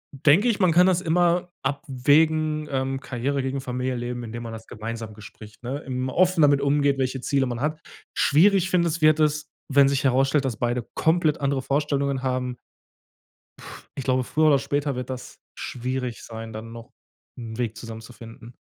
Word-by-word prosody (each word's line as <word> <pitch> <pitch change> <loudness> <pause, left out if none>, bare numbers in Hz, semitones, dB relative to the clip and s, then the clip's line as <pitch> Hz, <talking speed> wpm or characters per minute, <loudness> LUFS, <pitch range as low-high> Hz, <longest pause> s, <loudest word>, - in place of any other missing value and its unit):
denke 150 - +4
ich, 230 -4 +1
man 185 -4 +4
kann 180 +3 +5
das 180 -1 +2
immer 175 +1 +1
abwägen, 150 +2 +1
ähm, 135 0 -1
Karriere 135 +2 -2
gegen 135 +1 -2
Familienleben, 125 -1 -3
indem 115 +1 -6
man 115 -1 -6
das 110 0 -9
gemeinsam 110 0 -6
bespricht, 105 0 -13
ne, 125 +3 -3
im 130 0 -2
offen 185 +2 +3
damit 145 -2 +5
umgeht, 140 0 +2
welche 130 -1 -1
Ziele 135 +1 +1
man 120 -1 -4
hat. 155 +2 -1 0.4
Schwierig, 190 +5 +4
finde 170 -2 +3
es, 170 0 -2
wird 155 0 +5
es, 150 0 +1 0.2
wenn 140 0 +6
sich 140 0 0
herausstellt, 135 +2 +3
dass 125 -5 -2
beide 120 +1 -1
komplett 160 -1 +2
andere 140 -1 0
Vorstellungen 140 -1 -1
haben. 125 -1 -2 1.0
Puh, - - -13 0.3
ich 135 - -5
glaube, 130 -1 +2
früher 155 +4 +2
oder 140 -2 +5
später 140 0 -1
wird 125 - -5
das 125 -1 -8
schwierig 125 -1 -4
sein, 115 0 -8
dann 110 +1 -8
noch 115 -1 -11 0.5
'n 115 -2 -7
Weg 115 -3 -2
zusammen 110 0 -8
zu 115 - -12
finden. 115 0 -13
135 Hz, 180 wpm, -24 LUFS, 120-150 Hz, 1.0 s, wenn